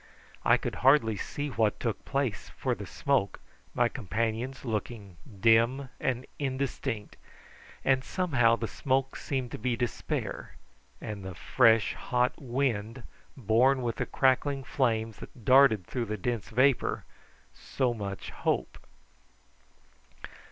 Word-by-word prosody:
I - - +5
could - - -4
hardly 130 -5 +4
see 145 +8 -4
what 110 -5 0
took 115 -3 -3
place 135 -7 -2
for - - 0
the - - -7
smoke, 135 -9 0 0.4
my 120 - +4
companions 115 +3 -3
looking 105 -4 -4 0.2
dim 115 +5 +3
and 130 0 -1
indistinct, 130 -6 -3 0.7
and 130 -1 +3
somehow 130 -12 +2
the 115 -1 -4
smoke 135 +2 -1
seemed 130 -4 -3
to - - -6
be 120 +2 0
despair, 120 - -3 0.4
and 105 -3 -6
the 95 -1 -7
fresh 115 +3 +3
hot 125 0 0
wind 120 -3 -2 0.3
borne 125 +3 +3
with 115 -2 -2
the - - -2
crackling 135 +1 +1
flames 115 -5 0
that 115 - -12
darted 125 -8 +6
through 120 +4 -3
the 110 -1 -4
dense 115 +2 -3
vapour 130 +3 +2 0.5
so 130 -3 -1
much 100 -4 -6
hope. - - -2
120 Hz, 125 wpm, -29 LUFS, 110-130 Hz, 0.7 s, darted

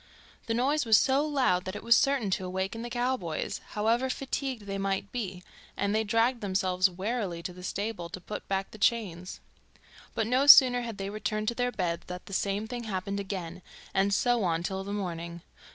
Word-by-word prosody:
The 225 - 0
noise 280 +5 +2
was 225 -2 +6
so 270 +2 +3
loud 255 -12 +1
that 185 +2 -5
it - - -7
was 235 +1 +6
certain 270 -8 +2
to 190 - 0
awaken 190 +4 -3
the 240 - -5
cowboys, 240 -10 -2
however 230 +5 +1
fatigued 265 -2 -3
they 195 0 -4
might 195 0 -2
be, 190 -7 -4 0.3
and 200 0 0
they 220 +1 +2
dragged 230 +3 +1
themselves 185 -1 +1
wearily 190 -2 -3
to 180 - -5
the 180 - -11
stable 200 -1 -4
to 185 - -7
put 210 +4 -7
back 195 0 -2
the 215 - -12
chains. 190 -6 0 0.8
But 225 - +1
no 255 +5 +2
sooner 250 -3 +9
had 230 -3 -5
they 195 0 -4
returned 215 0 -2
to - - -2
their 245 0 0
beds 175 -6 -2
than 180 0 -5
the 195 - -10
same 200 +3 -1
thing 240 0 -5
happened 200 -1 -3
again, 185 -3 -5 0.3
and 195 +1 +2
so 240 +3 +2
on 170 -2 0
till 190 +1 -3
the 200 - -6
morning. 170 -4 -4
200 Hz, 200 wpm, -29 LUFS, 185-235 Hz, 0.8 s, sooner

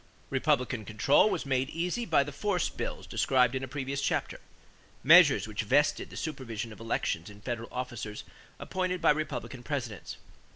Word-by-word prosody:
Republican 125 -2 +1
control 110 - +3
was - - -2
made 135 0 0
easy 180 +9 -2
by 155 -4 +4
the 145 - -7
force 180 +4 0
bills - - -5
described 125 -2 +2
in 130 0 -2
a - - -4
previous 135 0 -3
chapter - - -1 0.6
measures 145 - +7
which 110 -1 -3
vested 145 +7 +2
the - - -10
supervision 120 -7 -5
of - - -15
elections 110 -6 -2
in 105 0 -13
federal 115 +1 -5
officers 120 -4 -5 0.3
appointed 185 -1 -2
by 165 - +5
Republican 140 -4 -3
Presidents. 125 -6 -5
130 Hz, 160 wpm, -29 LUFS, 115-150 Hz, 0.6 s, measures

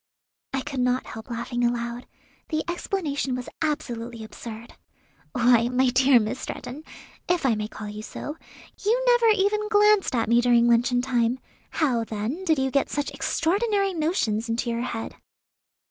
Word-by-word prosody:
I 270 - -1
could 270 0 -5
not 250 +1 +1
help 220 +2 -9
laughing 240 +1 -3
aloud; 240 0 -1 0.4
the 310 -1 -1
explanation 320 -7 -2
was 250 -1 -5
absolutely 240 -7 -3
absurd. 220 +1 -9 0.6
"Why, 240 -1 +4
my 250 0 +2
dear 260 0 +5
Miss 215 +4 -2
Stretton, 275 +5 -7 0.5
if 350 -4 +1
I 250 - +4
may 210 -1 -2
call 215 -1 -8
you 210 +1 -6
so, 295 +6 -6 0.5
you 450 +5 +3
never 485 -2 +5
even 425 0 +2
glanced 420 -6 +4
at 230 -2 +1
me 235 +1 +4
during 240 -1 +4
luncheon 245 +1 +3
time; 245 -1 +1 0.3
how, 255 -8 +1
then, 225 - -4
did 320 -3 +3
you 265 0 0
get 275 0 +1
such 290 -1 -2
extraordinary 395 +3 0
notions 270 - 0
into 235 +1 -1
your 230 0 -2
head?" 235 -2 -5
250 Hz, 160 wpm, -25 LUFS, 235-315 Hz, 0.6 s, dear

